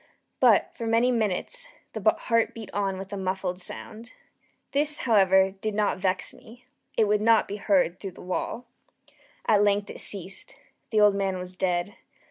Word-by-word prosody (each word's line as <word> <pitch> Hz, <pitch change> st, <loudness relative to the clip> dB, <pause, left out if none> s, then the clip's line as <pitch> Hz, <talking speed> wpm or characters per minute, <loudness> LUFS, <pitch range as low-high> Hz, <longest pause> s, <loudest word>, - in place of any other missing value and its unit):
But, -, -, +4 dB
for 230 Hz, -, -5 dB
many 230 Hz, +2 st, +3 dB
minutes, 235 Hz, -, -1 dB, 0.3 s
the -, -, -5 dB
heart 230 Hz, -1 st, 0 dB
beat 225 Hz, -3 st, -8 dB
on 195 Hz, -2 st, -1 dB
with 195 Hz, +1 st, -8 dB
a -, -, -3 dB
muffled 185 Hz, -1 st, -3 dB
sound. 225 Hz, +6 st, -9 dB, 0.6 s
This, 295 Hz, +1 st, +1 dB
however, 190 Hz, -4 st, +4 dB
did 205 Hz, +2 st, -4 dB
not 210 Hz, -2 st, +1 dB
vex 185 Hz, 0 st, -1 dB
me; 245 Hz, +3 st, -16 dB, 0.3 s
it 220 Hz, -, +4 dB
would 210 Hz, 0 st, +2 dB
not 225 Hz, 0 st, +4 dB
be 205 Hz, -, -5 dB
heard 210 Hz, -, +1 dB
through 195 Hz, -3 st, -7 dB
the -, -, -13 dB
wall. 185 Hz, +6 st, -4 dB, 0.8 s
At 205 Hz, -2 st, +4 dB
length 205 Hz, 0 st, +1 dB
it -, -, -7 dB
ceased. 190 Hz, -1 st, -1 dB, 0.3 s
The 215 Hz, -, +2 dB
old 210 Hz, -1 st, +6 dB
man 195 Hz, -1 st, -1 dB
was 180 Hz, 0 st, -6 dB
dead. 180 Hz, +2 st, -1 dB
205 Hz, 170 wpm, -26 LUFS, 190-225 Hz, 0.8 s, old